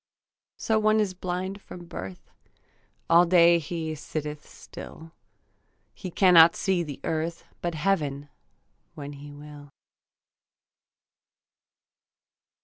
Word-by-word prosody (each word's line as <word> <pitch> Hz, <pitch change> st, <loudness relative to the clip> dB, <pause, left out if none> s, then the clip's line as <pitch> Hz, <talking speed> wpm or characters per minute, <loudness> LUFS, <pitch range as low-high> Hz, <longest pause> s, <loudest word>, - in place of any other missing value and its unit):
So 220 Hz, -1 st, +1 dB
one 215 Hz, 0 st, +3 dB
is 205 Hz, -3 st, 0 dB
blind 185 Hz, +2 st, -4 dB
from 175 Hz, -2 st, -11 dB
birth; 95 Hz, -, -9 dB, 0.8 s
All 170 Hz, +1 st, +6 dB
day 170 Hz, -1 st, +6 dB
he 160 Hz, 0 st, -4 dB
sitteth 150 Hz, 0 st, -6 dB
still; 160 Hz, 0 st, -11 dB, 0.8 s
He 185 Hz, -, -7 dB
cannot 170 Hz, -2 st, +6 dB
see 190 Hz, -3 st, 0 dB
the 150 Hz, -5 st, -6 dB
earth, 165 Hz, +1 st, -2 dB, 0.2 s
But 170 Hz, -1 st, -2 dB
heaven 150 Hz, -5 st, -1 dB, 0.7 s
when 145 Hz, -1 st, -7 dB
he 145 Hz, +1 st, -11 dB
will. 145 Hz, 0 st, -12 dB
165 Hz, 100 wpm, -26 LUFS, 150-180 Hz, 0.8 s, All